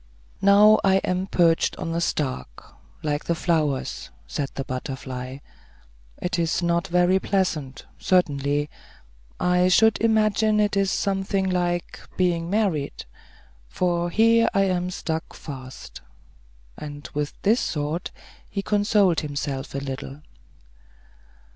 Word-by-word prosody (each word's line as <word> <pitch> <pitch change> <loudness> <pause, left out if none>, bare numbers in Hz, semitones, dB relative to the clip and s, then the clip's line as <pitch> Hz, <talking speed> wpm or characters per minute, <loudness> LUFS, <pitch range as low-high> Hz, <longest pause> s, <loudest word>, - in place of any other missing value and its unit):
"Now 205 +2 +6
I 190 -1 +4
am 185 +1 -1
perched 170 -3 +2
on 165 -2 -4
a 170 - -1
stalk, 130 - -3 0.3
like 150 -1 -2
the 170 - 0
flowers," 155 -5 -1 0.2
said 140 -2 -3
the 135 - -3
butterfly. 130 0 -5 0.8
"It 180 +1 -2
is 165 +1 0
not 170 +2 +1
very 180 +2 +3
pleasant, 160 -10 -2
certainly; 145 -5 +1 0.7
I 180 0 +3
should 220 +4 +4
imagine 215 -1 +3
it 210 -1 +2
is 195 -1 +2
something 195 0 0
like 175 -1 -1 0.2
being 175 -2 +1
married; 190 -9 -1 0.6
for 175 - 0
here 230 +4 +4
I 195 - +4
am 180 -2 0
stuck 160 -3 -4
fast." 130 -3 -9 0.8
And 145 -1 -8
with 150 0 -3
this 220 +5 +2
thought 150 +3 -3 0.4
he 200 -1 -3
consoled 205 -3 +3
himself 140 -2 -4
a - - 0
little. 140 +1 -6
175 Hz, 120 wpm, -24 LUFS, 145-195 Hz, 0.8 s, Now